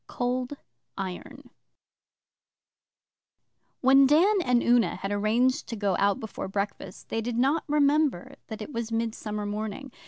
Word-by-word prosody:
COLD 250 +3 -2 0.4
IRON 190 -2 -7 2.3
When 270 +1 +6
Dan 370 +8 +4
and 245 -4 +2
Una 235 -7 +3
had 195 - -5
arranged 225 +5 +1
to 230 - -5
go 200 -3 0
out 200 0 +2
before 220 -3 -6
breakfast, 200 +1 -5
they 225 - -1
did 235 +1 -3
not 275 +6 +2
remember 290 - +1
that 220 -1 -6
it 275 - -10
was 230 -1 -4
Midsummer 220 -2 -3
Morning. 215 +5 -5
230 Hz, 130 wpm, -27 LUFS, 210-270 Hz, 2.3 s, When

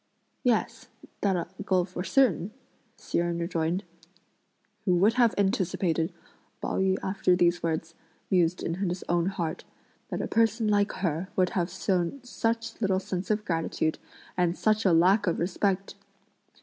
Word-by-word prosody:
"Yes, 240 -3 0 0.3
that 195 -2 +2
I'll 170 - -3 0.2
go 185 -3 +2
for 180 -1 -5
certain," 195 - +2 0.5
Hsi - - -2
Jen 170 0 0
rejoined. 170 +1 -1 1.0
"Who 180 -3 +3
would 200 +6 +4
have 240 -2 +3
anticipated," 185 -3 +1 0.5
Pao - - -2
yü, 190 0 +2
after 190 -1 +2
these 175 0 +2
words, 165 0 -2 0.4
mused 180 -1 +2
in 165 - -1 0.2
his 180 +1 -4
own 170 0 +1
heart, 175 -5 -3 0.5
"that - - -3
a - - -2
person 225 0 +2
like 205 0 +2
her 170 +3 -1
would 185 -1 +2
have 175 -1 0
shown 180 +5 -1
such 230 -2 -2
little 190 -3 +2
sense 190 -1 -4
of 210 0 0
gratitude, 165 -2 -1 0.4
and 180 -1 +1
such 215 0 +2
a 190 - +5
lack 185 +5 +4
of 170 - +1
respect! 190 +2 -1
185 Hz, 150 wpm, -28 LUFS, 170-205 Hz, 1.0 s, a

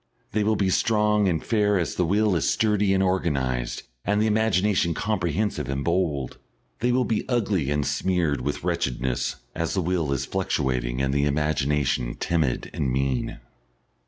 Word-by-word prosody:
They 105 +2 +1
will 110 +1 +2
be 95 -2 +1
strong 105 -1 +2
and 85 -4 -1
fair 105 -3 +2
as 85 - -1
the 90 - 0
will 105 +1 +2
is 80 - +1
sturdy 105 -3 +2
and 95 0 +3
organised 70 -10 -1 0.2
and 105 +1 +1
the 110 - +3
imagination 105 -5 +2
comprehensive 95 - -1
and 70 0 -2
bold; 85 -6 -1 0.4
they 120 +2 +1
will 125 0 +2
be 110 -2 0
ugly 100 - 0
and 75 -1 0
smeared 85 -6 0
with 70 +3 -3
wretchedness 65 -1 -1 0.2
as 85 +3 -2
the 95 - +1
will 85 -4 0
is 70 -1 -1
fluctuating 65 -9 -1
and 70 0 0
the 70 0 +2
imagination 70 -4 0
timid 80 -7 -1
and 65 -3 -1
mean. 65 -1 -1
85 Hz, 160 wpm, -25 LUFS, 70-105 Hz, 0.4 s, and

